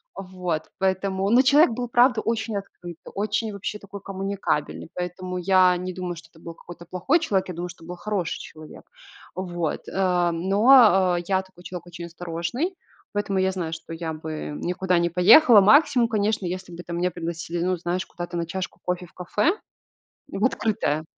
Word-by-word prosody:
Вот. 180 -4 -4 0.2
Поэтому, 190 0 0
ну, 245 +4 +5
человек 285 +1 +5
был 245 0 -3
правда 240 -1 +4
очень 225 -2 -2
открытый, 175 -4 -9 0.2
очень 215 +2 -1
вообще 200 +1 -4
такой 200 0 -10
коммуникабельный, 195 -6 -3
поэтому 180 +1 -4
я 185 0 +4
не 185 +1 -5
думаю, 180 -1 -4
что 160 0 -13
это 160 - -19
был 165 0 -10 0.3
плохой 185 - +2
человек. 195 - -1
Я - - -4
думаю, 175 +1 -5
что 165 -1 -13
это 165 - -13
был 180 - -6
хороший 200 -4 -3
человек. 155 -1 -12 0.5
Вот, 175 -3 -3
э, 180 -2 +1
но, 195 +1 +5
э, 175 - -2
я 190 -1 +2
такой 185 -2 -19
человек 180 -1 -7
очень 175 0 -8
осторожный. 175 - -4 0.4
Поэтому 200 -2 -1
я 190 0 +2
знаю, 175 -4 -4
что 165 0 -7
я 165 -1 -4
бы 155 -1 -6
никуда 180 +1 0
не 170 0 +1
поехала. 210 - +7
Максимум, 240 +1 +5
конечно, 215 -2 0
если 180 0 -5
бы, 175 - -9
там, 170 0 -5
меня 180 +1 0
пригласили, 170 0 -4
ну, 185 0 0
знаешь, 175 +2 -2
куда-то 175 -1 -7
на 170 - -1
чашку 185 +3 -5
кофе 180 0 -2
в 170 - -20
кафе 210 - 0 0.7
В - - -3
открытое 155 -8 0
185 Hz, 180 wpm, -24 LUFS, 175-200 Hz, 0.7 s, поехала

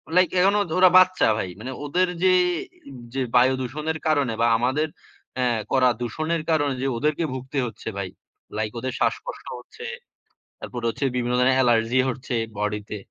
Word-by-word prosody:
Like, 180 -2 +5
এখনো 200 +3 +4 0.2
ওরা 185 0 +8
বাচ্চা 185 0 +5
ভাই। 95 - -2
মানে 125 +4 -6
ওদের 180 +5 +2 0.2
যে, 185 -1 +5 0.8
যে 135 - -1
বায়ু 125 +2 +5
দূষণের 150 +5 -3
কারণে 145 -6 +2
বা 115 - +4
আমাদের 130 +6 0 0.5
আ - - +2 0.3
করা 130 -2 +4
দূষণের 155 +7 -2
কারণে 145 -3 +2
যে, 135 - 0
ওদেরকে 150 +5 0
ভুগতে 130 +2 -6
হচ্ছে 110 -1 -10
ভাই। 100 -2 -3 0.5
লাইক 110 0 -1
ওদের 130 +1 -3
শ্বাসকষ্ট - - -2
হচ্ছে। 465 - -12 0.7
তারপর 120 - -6
হচ্ছে 125 - -4
বিভিন্ন 125 0 0
ধরনের 130 +1 +4
অ্যালার্জি 120 -1 +3
হচ্ছে 130 0 -4 0.2
বডিতে। 105 0 -3
130 Hz, 155 wpm, -24 LUFS, 120-155 Hz, 0.8 s, ওরা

